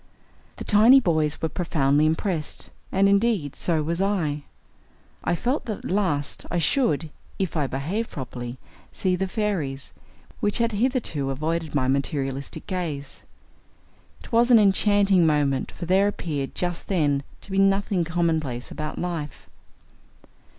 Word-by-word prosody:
The - - -7
tiny 225 +6 +7
boys 155 - 0
were - - +3
profoundly 150 -3 +2
impressed, 160 -1 -2 0.2
and, 195 +1 +3
indeed, 200 - +2
so 160 -3 0
was 170 +4 -1
I. 160 -8 0 0.8
I 175 - +1
felt 250 - -1
that 215 -3 -2
at - - -3
last, 175 -8 0
I 175 - -1
should, 160 - +1 0.3
if 190 -3 -2
I 150 -4 +1
behaved 170 - -3
properly, 125 -2 -6 0.3
see 185 -1 0
the 190 +1 -1
fairies, 180 - -2 0.5
which 205 - +1
had 235 -1 +1
hitherto 210 - 0
avoided 155 +3 -2
my 130 -3 +2
materialistic 135 0 -2
gaze. 155 -7 -5 1.0
It - - -13
was 235 +1 +4
an 240 - +8
enchanting 200 -3 +4
moment, 145 -3 +1
for - - -7
there 190 +3 +3
appeared, 150 -9 -3
just 175 -1 -3
then, 145 -7 +1 0.2
to - - -12
be 195 - +1
nothing 195 -2 +2
commonplace 160 -7 -1
about 155 -1 -5
life. 165 -5 -4
170 Hz, 140 wpm, -24 LUFS, 145-200 Hz, 1.0 s, an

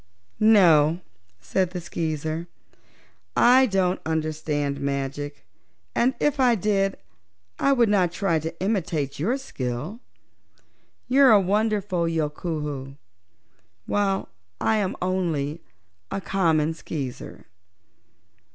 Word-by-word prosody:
"No," 170 -7 +5 0.4
said 175 - 0
the 180 0 -5
Skeezer, 160 -1 -3 0.9
"I 255 +2 +6
don't 190 -3 0
understand 155 -3 -2
magic 140 +1 -4 0.5
and 255 +2 +2
if 295 -1 +1
I 250 -2 +4
did 195 -1 0 0.6
I 275 - +3
would 240 -3 +3
not 190 -4 +2
try 175 -3 0
to 160 +2 -6
imitate 175 -9 -1
your 225 - 0
skill. 145 - -5 1.1
You 265 +3 +3
are 255 - +7
a 210 - +7
wonderful 200 -2 0
Yookoohoo, 150 -3 -3 0.9
while 195 -1 0 0.3
I 220 - +2
am 195 -3 -1
only 170 -5 -1 0.5
a - - -3
common 165 -5 +1
Skeezer." 140 -6 -7
175 Hz, 105 wpm, -24 LUFS, 150-205 Hz, 1.1 s, are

